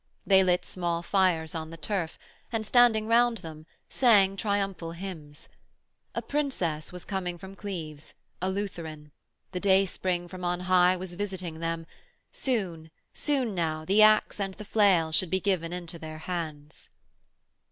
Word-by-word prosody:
They 190 Hz, -1 st, +6 dB
lit 180 Hz, -1 st, +2 dB
small 170 Hz, -2 st, -2 dB
fires 175 Hz, -4 st, +2 dB
on 160 Hz, -1 st, -4 dB
the 165 Hz, -, -9 dB
turf 165 Hz, +1 st, -2 dB, 0.3 s
and, 225 Hz, -2 st, -1 dB
standing 230 Hz, -2 st, +5 dB
round 235 Hz, +1 st, +4 dB
them, 160 Hz, -4 st, -10 dB, 0.2 s
sang 205 Hz, -6 st, +4 dB
triumphal 195 Hz, -5 st, -1 dB
hymns. 165 Hz, -5 st, -7 dB, 0.7 s
A -, -, -2 dB
Princess 185 Hz, -, -2 dB
was 180 Hz, -1 st, -7 dB
coming 180 Hz, -3 st, -3 dB
from 190 Hz, +3 st, -10 dB
Cleves, 165 Hz, -7 st, -7 dB, 0.3 s
a 185 Hz, -, 0 dB
Lutheran; 165 Hz, -7 st, -5 dB, 0.4 s
the 180 Hz, -, -3 dB
day 195 Hz, 0 st, +4 dB
spring 180 Hz, -1 st, -2 dB
from 185 Hz, +1 st, -9 dB
on 175 Hz, 0 st, -1 dB
high 180 Hz, 0 st, +4 dB
was 180 Hz, -1 st, -6 dB
visiting 185 Hz, -4 st, -4 dB
them; 165 Hz, 0 st, -2 dB, 0.5 s
soon, 180 Hz, -11 st, -2 dB, 0.2 s
soon 265 Hz, -7 st, 0 dB
now, 160 Hz, -3 st, -1 dB
the 200 Hz, +5 st, +4 dB
axe 215 Hz, 0 st, +5 dB
and 195 Hz, -1 st, -2 dB
the 210 Hz, -, -9 dB
flail 190 Hz, -7 st, +3 dB
should 170 Hz, +2 st, +1 dB
be 190 Hz, -, +1 dB
given 180 Hz, -4 st, 0 dB
into 175 Hz, -1 st, -6 dB
their 155 Hz, -1 st, -7 dB
hands. 155 Hz, -3 st, -6 dB
180 Hz, 150 wpm, -28 LUFS, 165-200 Hz, 0.7 s, They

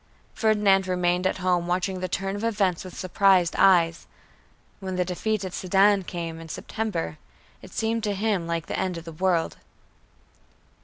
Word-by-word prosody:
Ferdinand 205 Hz, -4 st, +3 dB
remained 180 Hz, 0 st, +1 dB
at -, -, -1 dB
home 180 Hz, -2 st, 0 dB
watching 185 Hz, +1 st, -1 dB
the 185 Hz, -, -2 dB
turn 195 Hz, +2 st, -2 dB
of 205 Hz, -, -5 dB
events 200 Hz, -6 st, 0 dB
with 185 Hz, -2 st, -10 dB
surprised 185 Hz, -1 st, +3 dB
eyes. 170 Hz, -4 st, +4 dB, 0.7 s
When 190 Hz, -2 st, -4 dB
the 180 Hz, 0 st, 0 dB
defeat 195 Hz, +3 st, -2 dB
at 185 Hz, -, -6 dB
Sedan 195 Hz, +1 st, +3 dB
came, 165 Hz, -2 st, -5 dB
in 165 Hz, 0 st, -10 dB
September, 155 Hz, -, -4 dB, 0.4 s
it -, -, -13 dB
seemed 225 Hz, 0 st, -1 dB
to 205 Hz, -1 st, -1 dB
him 200 Hz, -4 st, 0 dB
like 170 Hz, -1 st, -2 dB
the -, -, -3 dB
end 185 Hz, -2 st, -1 dB
of 165 Hz, -, -8 dB
the 165 Hz, -, -7 dB
world. 170 Hz, 0 st, 0 dB
185 Hz, 165 wpm, -25 LUFS, 175-200 Hz, 0.7 s, eyes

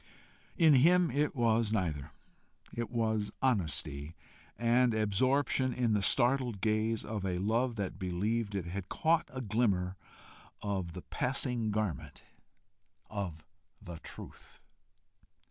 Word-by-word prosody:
In 160 Hz, -4 st, +6 dB
him 170 Hz, +6 st, +5 dB
it 145 Hz, +1 st, 0 dB
was 115 Hz, -3 st, +2 dB
neither: 80 Hz, -10 st, -1 dB, 0.6 s
it 120 Hz, -1 st, -3 dB
was 110 Hz, -3 st, 0 dB
honesty 80 Hz, -, -1 dB, 0.4 s
and 120 Hz, 0 st, +3 dB
absorption 130 Hz, +5 st, +1 dB
in 120 Hz, -3 st, +1 dB
the 105 Hz, -, +2 dB
startled 120 Hz, 0 st, +2 dB
gaze 110 Hz, +2 st, 0 dB
of 105 Hz, -2 st, -4 dB
a 90 Hz, -2 st, -1 dB
love 115 Hz, +6 st, +1 dB
that 100 Hz, -2 st, -4 dB
believed 100 Hz, +4 st, -1 dB
it 95 Hz, -3 st, -2 dB
had 90 Hz, +2 st, -5 dB
caught 160 Hz, 0 st, +1 dB
a 130 Hz, -, -5 dB
glimmer 100 Hz, -5 st, 0 dB, 0.6 s
of 95 Hz, -5 st, -3 dB
the 90 Hz, -, -8 dB
passing 125 Hz, -3 st, -1 dB
garment 105 Hz, -4 st, -3 dB, 0.9 s
of 90 Hz, -7 st, -5 dB, 0.3 s
the 85 Hz, -2 st, -9 dB
Truth. -, -, -12 dB
110 Hz, 120 wpm, -32 LUFS, 95-125 Hz, 0.9 s, In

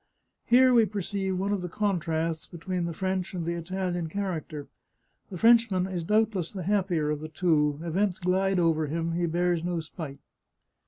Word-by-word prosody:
Here 255 Hz, +1 st, +6 dB
we 230 Hz, -3 st, +5 dB
perceive 195 Hz, -2 st, -2 dB
one 195 Hz, +2 st, -1 dB
of 200 Hz, -, -1 dB
the 180 Hz, -, -4 dB
contrasts 165 Hz, -5 st, -1 dB
between 175 Hz, +1 st, -3 dB
the 170 Hz, -, -3 dB
French 185 Hz, +2 st, -2 dB
and 170 Hz, -2 st, -3 dB
the 170 Hz, -, -1 dB
Italian 175 Hz, 0 st, -3 dB
character; 160 Hz, -6 st, -4 dB, 0.6 s
the 185 Hz, -, -6 dB
French 230 Hz, +3 st, +5 dB
man 185 Hz, -2 st, 0 dB
is 185 Hz, -3 st, -3 dB
doubtless 210 Hz, -2 st, +1 dB
the 190 Hz, -3 st, -5 dB
happier 180 Hz, -6 st, +1 dB
of 150 Hz, -, -2 dB
the 155 Hz, +1 st, -7 dB
two 150 Hz, -4 st, +1 dB
— -, -, -7 dB
events 180 Hz, +3 st, 0 dB
glide 190 Hz, +1 st, +1 dB
over 165 Hz, -3 st, +2 dB
him; 165 Hz, +2 st, -2 dB
he 170 Hz, +1 st, 0 dB
bears 175 Hz, 0 st, 0 dB
no 175 Hz, -1 st, -1 dB
spite. 155 Hz, -3 st, -7 dB
180 Hz, 180 wpm, -27 LUFS, 165-195 Hz, 0.6 s, Here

